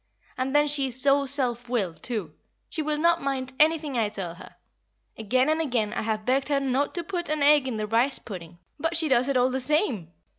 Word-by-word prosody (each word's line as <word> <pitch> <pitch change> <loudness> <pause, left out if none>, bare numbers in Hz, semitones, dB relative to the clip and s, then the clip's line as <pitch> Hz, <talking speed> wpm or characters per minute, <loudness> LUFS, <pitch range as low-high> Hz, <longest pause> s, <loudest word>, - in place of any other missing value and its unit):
And 260 +2 -2
then 295 0 +4
she 285 -2 0
is 255 0 -5
so 275 +1 +3
self 245 -3 0
willed, 195 -9 -2
too 210 -11 -4 0.4
she 320 - -3
will 300 0 -1
not 335 +2 +2
mind 265 -1 -3
anything 305 -4 +2
I 215 -2 +1
tell 190 -5 -5
her. 170 - -13 0.6
Again 255 +5 +1
and 315 +1 +1
again 240 -8 -1
I - - -2
have 215 -1 -2
begged 270 +3 +1
her 285 -1 +2
not 275 +3 -1
to 345 - -2
put 345 -1 -4
an 305 -1 0
egg 290 -2 +5
in 240 -4 -3
the 215 - -2
rice 235 +6 +2
pudding, 175 -5 -9 0.2
but 325 +2 0
she 325 -1 +2
does 255 +1 +3
it 275 - +2
all 250 +1 +3
the 265 - -1
same." 255 - 0
265 Hz, 225 wpm, -26 LUFS, 230-295 Hz, 0.6 s, egg